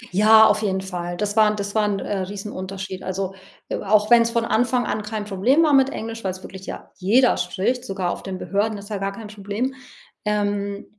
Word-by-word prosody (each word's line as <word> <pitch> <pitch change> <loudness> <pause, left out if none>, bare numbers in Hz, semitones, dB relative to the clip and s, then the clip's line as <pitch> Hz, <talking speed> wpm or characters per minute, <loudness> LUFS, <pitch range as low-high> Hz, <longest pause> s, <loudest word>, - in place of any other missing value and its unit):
Ja, 220 +2 +7
auf 215 0 +3
jeden 190 -3 0
Fall, 175 -2 -5
das 205 0 -2
war 220 -1 +6
'n 210 - -1
das 200 -1 -4
war 215 -1 +2
'n, 205 -1 0
äh, 195 +1 -3
Riesenunterschied, 190 -1 -6
also, 190 0 -3 0.3
e - - -3
auch 210 +2 +2
wenn's 235 -1 +6
von 230 0 0
Anfang 245 +2 +1
an 215 - -2
kein 210 0 -4
Problem 220 - +3
war 305 -2 +3
mit 270 -1 +5
Englisch, 225 -3 -6
weil's 185 -1 -4
wirklich 190 0 -10
ja - - -8
jeder 235 +7 +4
spricht, 245 +6 -1
sogar 190 -2 -2
auf - - -5
den 190 -1 -5
Behörden, 205 +3 -1
ist 200 +2 -11
ja 205 - -2
gar 195 0 -2
kein 220 +3 -9
Problem, 210 +5 -3 0.5
ähm, 205 -1 -1
205 Hz, 215 wpm, -22 LUFS, 195-220 Hz, 0.5 s, Ja